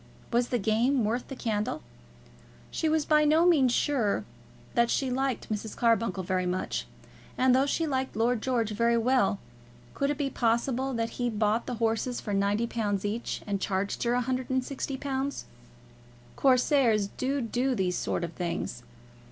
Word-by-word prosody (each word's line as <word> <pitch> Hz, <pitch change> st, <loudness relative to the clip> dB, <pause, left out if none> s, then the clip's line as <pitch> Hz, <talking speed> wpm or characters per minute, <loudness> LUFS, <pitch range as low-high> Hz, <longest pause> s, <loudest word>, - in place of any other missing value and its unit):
Was 240 Hz, +1 st, +3 dB
the 245 Hz, -, 0 dB
game 230 Hz, +4 st, +2 dB
worth 235 Hz, +4 st, -1 dB
the 270 Hz, -, -7 dB
candle? 215 Hz, -6 st, -2 dB, 0.9 s
She 320 Hz, -, 0 dB
was 310 Hz, -1 st, +1 dB
by 300 Hz, -1 st, +4 dB
no 310 Hz, +3 st, +4 dB
means 290 Hz, -8 st, +5 dB
sure 245 Hz, -6 st, +1 dB, 0.5 s
that 235 Hz, 0 st, +3 dB
she 265 Hz, -2 st, 0 dB
liked 260 Hz, -3 st, -2 dB
Mrs. 210 Hz, +1 st, -5 dB
Carbuncle 230 Hz, -5 st, +1 dB
very 185 Hz, 0 st, -1 dB
much. 180 Hz, +1 st, -2 dB, 0.5 s
And 255 Hz, 0 st, +4 dB
though 270 Hz, +2 st, +3 dB
she 325 Hz, +3 st, 0 dB
liked 265 Hz, -3 st, -2 dB
Lord 230 Hz, +1 st, +1 dB
George 235 Hz, -4 st, 0 dB
very 235 Hz, +2 st, +2 dB
well, 230 Hz, -3 st, +2 dB, 0.6 s
could 280 Hz, -, 0 dB
it 290 Hz, -, -1 dB
be 280 Hz, -2 st, -1 dB
possible 245 Hz, +3 st, 0 dB
that 230 Hz, 0 st, -1 dB
he 245 Hz, -, +1 dB
bought 215 Hz, +1 st, 0 dB
the 250 Hz, -, -2 dB
horses 225 Hz, +2 st, 0 dB
for 205 Hz, -, -4 dB
£90 205 Hz, 0 st, 0 dB
each 220 Hz, +3 st, -3 dB
and 200 Hz, -2 st, -2 dB
charged 195 Hz, 0 st, -1 dB
her 240 Hz, 0 st, +1 dB
£160? 265 Hz, +2 st, -2 dB, 0.9 s
Corsairs 255 Hz, -5 st, +3 dB
do 275 Hz, +6 st, -2 dB
do 250 Hz, +2 st, 0 dB
these 185 Hz, -4 st, 0 dB
sort -, -, -2 dB
of 170 Hz, -1 st, -4 dB
things. 170 Hz, -8 st, -3 dB
235 Hz, 155 wpm, -28 LUFS, 215-265 Hz, 0.9 s, means